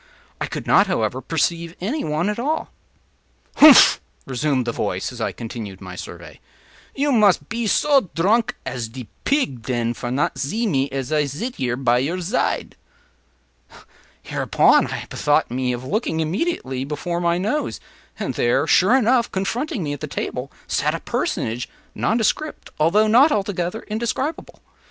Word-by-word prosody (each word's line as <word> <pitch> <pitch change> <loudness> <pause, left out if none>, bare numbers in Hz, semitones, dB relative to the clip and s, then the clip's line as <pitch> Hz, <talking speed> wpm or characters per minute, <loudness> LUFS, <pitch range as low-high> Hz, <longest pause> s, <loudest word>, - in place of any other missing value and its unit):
I - - -2
could - - -6
not, - - +5
however, - - -1
perceive 170 0 -1
any 250 - -2
one 155 +4 -1
at 210 +2 -2
all. 300 +6 -2 0.9
“Humph!” 295 -4 +8 0.2
resumed 130 0 0
the 120 - -1
voice, - - -2
as - - -8
I - - 0
continued 110 -4 -7
my 95 -2 -9
survey, - - -9 0.6
“you 285 +1 +1
mus 210 -6 +5
pe 230 0 -4
so 275 - +3
dronk 215 +8 +2
as 125 -3 -4
de 125 -1 -9 0.2
pig, 265 - 0
den, 120 -1 -1
for 120 - -5
not 130 +4 -1
zee 215 - -1
me 140 -9 +1
as 135 +1 -4
I 150 -1 +2
zit 170 - -5
here 125 -2 -1
at 120 +1 +5
your 155 +9 -1
zide.” 180 +7 -1 1.5
Hereupon - - +3
I - - -5
bethought 150 -3 +1
me 125 0 -1
of 125 +1 -5
looking 160 - -1
immediately 160 - -2
before 160 +5 -3
my 170 0 +2
nose, 215 +12 -2 0.4
and - - -3
there, - - +1
sure 200 +8 +4
enough, 245 -1 +2
confronting 220 - -2
me 145 -2 -2
at 145 - -6
the - - -5
table - - -4
sat - - 0
a - - -4
personage 120 +3 -2 0.2
nondescript, 235 +7 -1
although 180 +8 +4
not 250 +8 +5
altogether 195 -2 -1
indescribable. 235 +8 -4
170 Hz, 155 wpm, -21 LUFS, -, 1.5 s, Humph